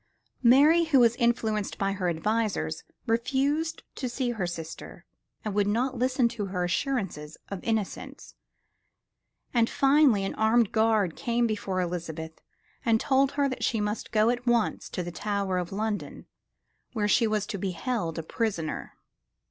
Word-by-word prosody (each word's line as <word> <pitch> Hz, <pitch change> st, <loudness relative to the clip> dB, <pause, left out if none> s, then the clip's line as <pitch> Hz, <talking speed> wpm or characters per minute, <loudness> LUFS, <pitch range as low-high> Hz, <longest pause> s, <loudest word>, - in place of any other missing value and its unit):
Mary, 290 Hz, +7 st, +6 dB
who 300 Hz, -5 st, +4 dB
was 235 Hz, -1 st, +5 dB
influenced 220 Hz, -3 st, 0 dB
by 195 Hz, -1 st, 0 dB
her 190 Hz, -3 st, -1 dB
advisers, 200 Hz, -1 st, -1 dB, 0.2 s
refused 275 Hz, +7 st, 0 dB
to 255 Hz, -, -4 dB
see 245 Hz, 0 st, -1 dB
her 205 Hz, -7 st, -2 dB
sister 165 Hz, -2 st, -8 dB, 0.4 s
and 215 Hz, -, -2 dB
would 205 Hz, 0 st, +2 dB
not 245 Hz, +5 st, 0 dB
listen 255 Hz, 0 st, +2 dB
to 210 Hz, -3 st, -4 dB
her 180 Hz, -2 st, -2 dB
assurances 175 Hz, -, -2 dB
of 200 Hz, -3 st, -6 dB
innocence, 220 Hz, -4 st, -3 dB, 1.2 s
and 235 Hz, -2 st, +3 dB
finally 275 Hz, -7 st, +4 dB
an -, -, -3 dB
armed 220 Hz, 0 st, +3 dB
guard 220 Hz, -6 st, +2 dB
came 235 Hz, 0 st, 0 dB
before 200 Hz, -4 st, -2 dB
Elizabeth 165 Hz, -3 st, -4 dB, 0.4 s
and 225 Hz, -4 st, +3 dB
told 270 Hz, +2 st, +2 dB
her 280 Hz, 0 st, +2 dB
that 255 Hz, -, -4 dB
she 225 Hz, -, +1 dB
must 210 Hz, +1 st, -3 dB
go 220 Hz, +1 st, +4 dB
at 245 Hz, 0 st, -4 dB
once 235 Hz, -2 st, +1 dB
to 180 Hz, -, -3 dB
the 175 Hz, -, -5 dB
Tower 200 Hz, 0 st, -1 dB
of 175 Hz, -1 st, -4 dB
London, 210 Hz, +1 st, -3 dB, 0.7 s
where 210 Hz, -3 st, 0 dB
she 230 Hz, +2 st, +3 dB
was 215 Hz, -1 st, 0 dB
to 200 Hz, -, -5 dB
be 195 Hz, -, -1 dB
held 180 Hz, -2 st, -2 dB
a 165 Hz, -, -3 dB
prisoner. 175 Hz, -4 st, -3 dB
220 Hz, 155 wpm, -27 LUFS, 190-245 Hz, 1.2 s, Mary